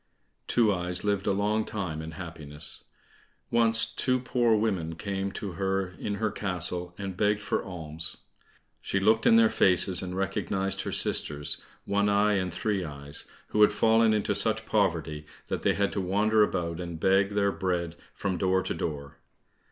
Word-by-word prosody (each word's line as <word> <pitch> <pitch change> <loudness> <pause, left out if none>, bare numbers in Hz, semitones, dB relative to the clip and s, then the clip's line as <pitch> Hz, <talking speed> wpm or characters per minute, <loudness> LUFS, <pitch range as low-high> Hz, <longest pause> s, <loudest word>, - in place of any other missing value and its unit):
Two 110 -4 +3
eyes 90 0 -2
lived 100 -1 0
a - - +4
long 105 +2 +1
time 90 -8 -4
in 80 +1 -7
happiness. 80 -4 -6 0.7
Once 115 -1 +4
two 130 -1 0
poor 120 -2 +2
women 95 -7 -1
came 100 +1 -3
to 100 -4 -5
her 95 +1 -1
in 105 - -2
her 110 0 -1
castle, 90 -3 -1
and 100 -2 -5
begged 105 +2 +2
for 105 - -2
alms. 80 -3 -7 0.6
She 100 - -1
looked 110 +3 +3
in 230 - +7
their 230 0 +7
faces, 90 - +3
and 90 0 -5
recognized 95 0 -1
her - - -4
sisters, 75 -1 0 0.2
One 100 +1 +1
eye, 105 +1 +3
and 95 -3 0
Three 100 +1 -1
eyes, 70 -2 -7 0.2
who 105 - +1
had 105 - +7
fallen 110 +1 +4
into 105 -1 +1
such 110 +2 +2
poverty 80 -7 0 0.2
that - - -2
they - - +2
had 100 0 +1
to 100 - -2
wander 105 +4 +2
about 85 -5 0
and 85 -2 -6
beg 95 +3 +3
their 100 -1 +2
bread 85 -3 -2 0.2
from 95 -3 -2
door 95 +1 +2
to 95 - -2
door. 75 -4 -5
95 Hz, 170 wpm, -28 LUFS, 85-105 Hz, 0.7 s, in